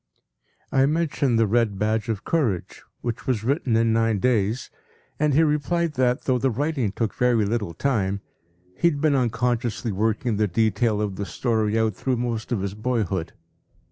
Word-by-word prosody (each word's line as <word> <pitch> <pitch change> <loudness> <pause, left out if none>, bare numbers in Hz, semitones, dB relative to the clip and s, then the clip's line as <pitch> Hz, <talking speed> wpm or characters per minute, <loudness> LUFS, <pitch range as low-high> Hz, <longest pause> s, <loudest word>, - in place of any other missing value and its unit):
p> - - -1
I 135 +1 +5
mentioned 145 -5 +1
“The 115 - +4
Red 110 -1 +1
Badge 110 +2 0
of 105 -3 -2
Courage,” 125 - -1 0.2
which 120 +1 -4
was 120 -5 0
written 130 -1 +1
in 115 0 +3
nine 115 -1 +2
days, 115 +1 0 0.5
and 150 -2 +2
he 160 - +5
replied 160 +2 0
that, 125 -2 +1
though 130 -2 +1
the 135 - +2
writing 135 -3 -1
took 110 +2 -2
very 120 -4 +2
little 105 -6 -2
time, 100 -4 0 0.5
he 170 - +3
had 145 -3 -3
been 155 0 +3
unconsciously 120 -2 0
working 110 +3 0
the 105 0 +2
detail 110 +2 +1
of 100 -3 -3
the 100 - -3
story 110 -3 0
out 110 -1 +1
through 130 -2 -1
most 115 -1 -3
of 115 -5 0
his 100 0 -3
boyhood. 105 -6 -2
115 Hz, 175 wpm, -24 LUFS, 105-130 Hz, 0.5 s, I